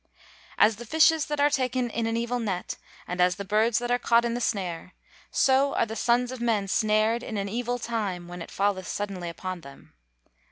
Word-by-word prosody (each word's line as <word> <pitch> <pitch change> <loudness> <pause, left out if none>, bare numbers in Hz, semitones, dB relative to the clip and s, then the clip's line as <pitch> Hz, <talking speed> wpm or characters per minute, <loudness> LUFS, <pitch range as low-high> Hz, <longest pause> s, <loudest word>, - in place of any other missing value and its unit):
[Verse: - - -42 0.5
"As 220 +1 +5
the 240 - -8
fishes 320 +2 +4
that 295 -1 -3
are 290 +1 +4
taken 255 -3 0
in 230 +1 -1
an 225 0 -1
evil 240 +1 -1
net, 195 -6 -3 0.3
and 180 0 -2
as 180 0 +4
the 200 - -6
birds 215 +3 +2
that 245 0 -2
are 245 - +2
caught 235 0 +3
in 235 - -1
the 240 - -3
snare; 185 -6 -3 0.3
so 270 +1 +3
are - - +2
the 220 - -6
sons 240 +2 +1
of 255 -2 -7
men 220 -4 +1
snared 215 +3 +2
in 220 -3 -5
an 200 0 -2
evil 245 +4 -2
time, 210 -7 -3
when 175 0 -8
it - - -7
falleth 195 -2 -1
suddenly 195 -4 -4
upon 185 +1 -6
them." 140 -2 -14
225 Hz, 215 wpm, -26 LUFS, 195-245 Hz, 0.5 s, As